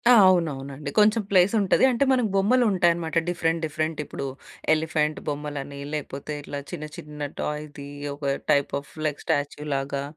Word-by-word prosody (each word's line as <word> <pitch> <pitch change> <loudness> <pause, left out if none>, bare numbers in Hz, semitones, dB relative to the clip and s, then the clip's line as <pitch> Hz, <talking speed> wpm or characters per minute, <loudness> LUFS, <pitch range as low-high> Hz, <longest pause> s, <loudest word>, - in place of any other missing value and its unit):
ఆ! - - +9 0.2
అవునవునండి. 145 -5 0
కొంచెం 215 +2 +5
ప్లేస్ 185 0 +5
ఉంటది. 195 - +3
అంటే 245 +2 +2
మనకు 250 -4 +2
బొమ్మలుంటాయనమాట 190 -7 +3
డిఫరెంట్, 165 -1 0
డిఫరెంట్. 155 +1 -2
ఇప్పుడు - - -5 0.5
ఎలిఫెంట్ 155 -1 0
బొమ్మలని, 145 -1 -4
లేకపోతే 150 0 -4
ఇట్లా 145 0 -5
చిన్న 155 - -5
చిన్న 150 -1 -6
టాయ్‌ది 150 -1 -5 0.3
ఒక 145 - -7 0.3
టైప్ 140 -1 +3
ఆఫ్ 140 - -16
లైక్ 150 -2 -1
స్టాచ్యూలాగా 140 -1 -1
150 Hz, 135 wpm, -25 LUFS, 145-175 Hz, 0.5 s, ఆ